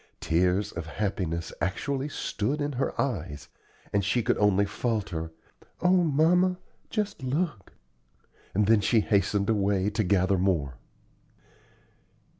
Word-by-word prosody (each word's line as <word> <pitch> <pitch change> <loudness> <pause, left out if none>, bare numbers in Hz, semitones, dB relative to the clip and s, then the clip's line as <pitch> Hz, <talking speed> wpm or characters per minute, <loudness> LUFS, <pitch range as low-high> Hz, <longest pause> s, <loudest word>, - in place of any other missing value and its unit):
Tears 90 +4 +1
of 80 - -6
happiness 85 -3 -3
actually 135 +9 -2
stood 140 +1 -2
in 145 0 -1
her 135 0 -2
eyes, 80 - -3 0.4
and 100 -1 +2
she 115 +5 +1
could - - +2
only 100 -1 +3
falter, 100 -7 -3 0.5
"O 180 - +3
mamma! 180 +2 +3 0.3
just 210 - -2
look!" 130 - -2 0.8
and 105 +1 +3
then 110 0 +4
she 110 +2 +3
hastened 100 0 +1
away 100 -2 +1
to 110 +1 0
gather 95 0 +2
more. 80 -9 0
105 Hz, 120 wpm, -27 LUFS, 95-135 Hz, 0.8 s, then